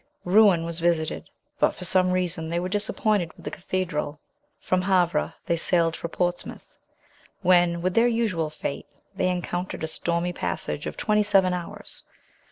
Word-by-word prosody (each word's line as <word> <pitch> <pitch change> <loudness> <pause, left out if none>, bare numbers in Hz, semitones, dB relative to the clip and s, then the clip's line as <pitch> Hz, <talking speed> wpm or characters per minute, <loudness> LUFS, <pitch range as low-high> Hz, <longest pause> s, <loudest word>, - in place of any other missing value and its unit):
Rouen 185 -3 +5
was 170 0 -4
visited; 165 -2 0 0.3
but - - +3
for 180 - -7
some 185 0 +3
reason 180 -3 -1
they 170 +1 0
were 180 - -2
disappointed 205 -2 0
with - - -17
the - - -3
cathedral. 175 -6 -3 0.4
From 185 0 0
Havre 180 -4 +1
they 170 - +1
sailed 165 -1 +2
for - - -5
Portsmouth, 175 +1 -3 0.7
when, 175 -1 +4
with 185 0 +1
their 230 +4 +4
usual 215 -9 0
fate, 150 -2 -5 0.3
they 185 -1 +1
encountered 180 -1 -3
a - - 0
stormy 170 +2 -1
passage - - -3
of - - -6
twenty 210 -1 +2
seven 195 -3 +3
hours. 175 -1 -4
180 Hz, 160 wpm, -25 LUFS, 170-185 Hz, 0.7 s, Rouen